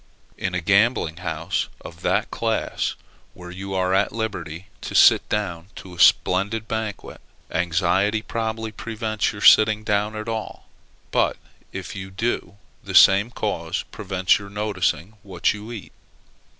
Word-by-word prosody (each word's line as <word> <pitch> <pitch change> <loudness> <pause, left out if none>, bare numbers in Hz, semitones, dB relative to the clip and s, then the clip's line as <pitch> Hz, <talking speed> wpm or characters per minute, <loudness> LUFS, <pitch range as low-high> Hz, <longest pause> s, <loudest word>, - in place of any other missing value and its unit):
In 90 -1 -3
a 90 - -1
gambling 100 -2 +2
house 85 +1 -2
of - - -11
that - - 0
class, - - -1 0.4
where 90 0 -10
you 95 +1 -6
are 95 0 +1
at 95 +2 +2
liberty 95 -6 -5 0.2
to - - -6
sit - - +6
down 90 -5 -2
to 95 - -10
a 85 - -12
splendid 100 +6 +3
banquet, 110 -3 -5 0.3
anxiety 95 +5 +1
probably 110 -1 -3
prevents 110 0 -2
your 105 -1 -8
sitting 110 0 +6
down 105 0 0
at 110 +1 -6
all; 110 -1 -5 0.5
but, - - +1 0.3
if - - -7
you 95 0 -6
do, 100 -1 -3 0.3
the - - -6
same 100 +4 +7
cause 90 -7 -3
prevents 95 -3 +1
your 100 0 -10
noticing 105 -1 -2
what 95 -4 0
you 105 +2 -9
eat. 110 -5 -8
100 Hz, 145 wpm, -23 LUFS, 90-110 Hz, 0.5 s, same